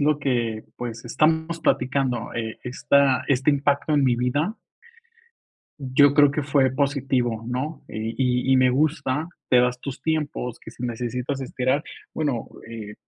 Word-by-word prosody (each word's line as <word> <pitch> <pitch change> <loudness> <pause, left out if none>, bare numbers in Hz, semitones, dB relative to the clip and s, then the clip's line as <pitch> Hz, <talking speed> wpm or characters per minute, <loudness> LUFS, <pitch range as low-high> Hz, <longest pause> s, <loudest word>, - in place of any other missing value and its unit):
lo 150 +1 +2
que, 120 -6 -1
pues 115 -1 -6
estamos 160 +6 +1
platicando, 125 -4 0
eh, 110 -1 -4
esta 130 +1 +2
este 135 +1 +3
impacto 140 +1 +1
en 145 - +3
mi 120 -2 +3
vida 145 - 0 1.2
yo 140 +2 +4
creo 145 -1 +6
que 145 +1 -2
fue 135 -2 +2
positivo, 130 -4 0
¿no? 135 +5 -4
Y 110 +1 -4 0.4
y - - +6
y - - +6
me 130 -1 +4
gusta. 150 +2 0 0.2
Te 125 - +5
das 125 0 0
tus 140 -2 -7
tiempos, 150 -6 -2
que - - -10
si - - -11
necesitas 125 +3 -3
esperar, 130 +2 0 0.3
bueno, 145 -7 -2 0.2
eh, 105 -2 -7
130 Hz, 150 wpm, -24 LUFS, 125-145 Hz, 1.2 s, creo